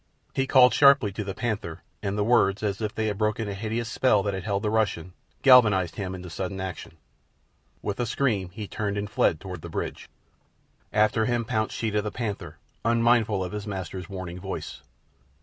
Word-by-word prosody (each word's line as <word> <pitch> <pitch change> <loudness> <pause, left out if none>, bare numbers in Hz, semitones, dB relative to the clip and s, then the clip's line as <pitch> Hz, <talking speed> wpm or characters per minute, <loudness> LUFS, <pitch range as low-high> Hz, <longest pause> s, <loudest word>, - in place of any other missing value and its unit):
He 135 0 0
called 125 -2 +6
sharply 140 -7 +6
to 100 +2 -4
the 95 -1 -5
panther, 105 -9 -3 0.2
and 100 +1 -2
the 105 - +2
words, 105 -3 +3
as 100 0 -1
if 110 0 -3
they 110 - -1
had 105 -1 -2
broken 110 0 0
a 100 - -3
hideous 110 +3 -3
spell 110 -3 +2
that 100 0 -1
had 95 -1 -5
held 100 0 -1
the 105 - 0
Russian, 95 -5 0 0.3
galvanized 105 - +6
him 95 -2 -3
into 90 0 -8
sudden 95 +2 -4
action. 90 -3 -6 0.9
With 100 +1 -3
a 120 - 0
scream 105 -7 0
he 105 +3 -7
turned 105 0 -3
and 100 0 -2
fled 85 -6 +1
toward 90 -3 -7
the - - -8
bridge. - - -5 0.8
After 110 +1 +3
him 120 -1 0
pounced 110 -2 -1
Sheeta 105 -2 0
the 105 - -3
panther, 105 -3 -5 0.3
unmindful 115 -3 +3
of 90 - -5
his 105 0 -5
master's 95 -2 -5
warning 90 -2 -6
voice. 95 +1 -6
105 Hz, 190 wpm, -26 LUFS, 95-110 Hz, 0.9 s, called